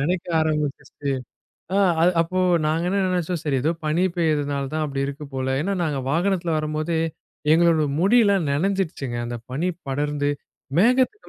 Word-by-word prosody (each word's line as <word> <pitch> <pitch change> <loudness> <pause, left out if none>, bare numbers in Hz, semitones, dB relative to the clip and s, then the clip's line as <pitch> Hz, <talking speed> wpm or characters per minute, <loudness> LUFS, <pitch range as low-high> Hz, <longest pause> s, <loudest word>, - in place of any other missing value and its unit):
நனைக்க 175 +5 -1
ஆரம்பிச்சிடுச்சு. 150 -2 -2 0.6
ஆ, - - +3 0.2
அது 175 +2 +5
அப்போ 185 +3 -1 0.3
நாங்க 160 +2 0
என்ன 200 +2 +1
நினைச்சோம்? 180 -1 -1
சரி 145 -3 0
ஏதோ 160 - +2 0.2
பனி 155 +4 +1
பெய்றனால 145 -4 0
தான் 155 0 0
அப்படி 140 -2 -3
இருக்கு 140 +2 -6
போல 130 0 -1
ஏன்னா, 195 +5 -1
நாங்க 150 -4 -1
வாகனத்துல 175 +1 +1
வரும்போதே, 155 +2 -1 0.5
எங்களோட 165 -1 +4 0.2
முடி 200 +7 +4
எல்லாம் 195 -6 +2
நனஞ்சிருச்சுங்க. 160 -5 -1
அந்தப் 120 -1 -6
பனி 165 +8 0 0.2
படர்ந்து, 145 +1 -1 0.5
மேகத்துக்கு 255 - +2
155 Hz, 150 wpm, -23 LUFS, 145-180 Hz, 0.6 s, அது